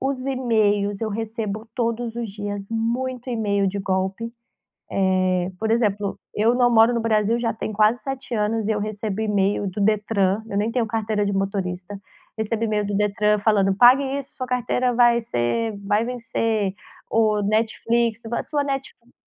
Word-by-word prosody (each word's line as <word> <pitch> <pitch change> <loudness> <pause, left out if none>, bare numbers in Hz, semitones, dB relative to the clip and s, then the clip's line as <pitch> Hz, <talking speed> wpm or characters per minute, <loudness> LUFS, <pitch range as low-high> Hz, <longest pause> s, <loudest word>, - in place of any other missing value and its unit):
os 265 -1 -2
emails 215 -6 +1
eu 225 - -1
recebo 220 0 -4
todos 235 -1 -2
os 235 -3 -3
dias 205 0 -5
muito 245 +3 -2
email 205 -4 0
de 200 +2 -3
golpe. 190 +4 -2 1.0
Eh, 180 0 0
por 220 0 0
exemplo, 205 -3 0 0.2
eu 225 +3 +3
não 245 -1 +3
moro 225 +1 +6
no 235 - 0
Brasil 225 0 +2
já 230 -1 0
tem 215 -1 -5
quase 215 +3 +3
7 265 -3 -4
anos 215 0 0
e - - +2
eu 210 - 0
recebo 210 -1 -3
email 205 -1 +1
do 200 +3 -4
Detran, 205 -1 +1
eu 200 - -5
nem 215 +3 0
tenho 240 -1 +1
carteira 215 -1 -1
de 200 - -1
motorista, 195 -1 -3 0.4
recebo 220 +1 -1
email 210 -2 0
do 200 0 -2
Detran 210 +1 +2
falando: 200 -2 +2
"Pague 250 +6 +7 0.2
isso! 275 0 -11
Sua 255 - -4
carteira 250 0 0
vai 240 0 +5
ser 220 - -1
vai 205 +3 +1
vencer", 225 -4 -1 0.3
ou 215 -2 +2
Netflix: 225 +2 0
"A 235 +1 -2
sua 290 -2 -1
Netflix" 270 -3 -5
220 Hz, 170 wpm, -23 LUFS, 205-235 Hz, 1.0 s, Pague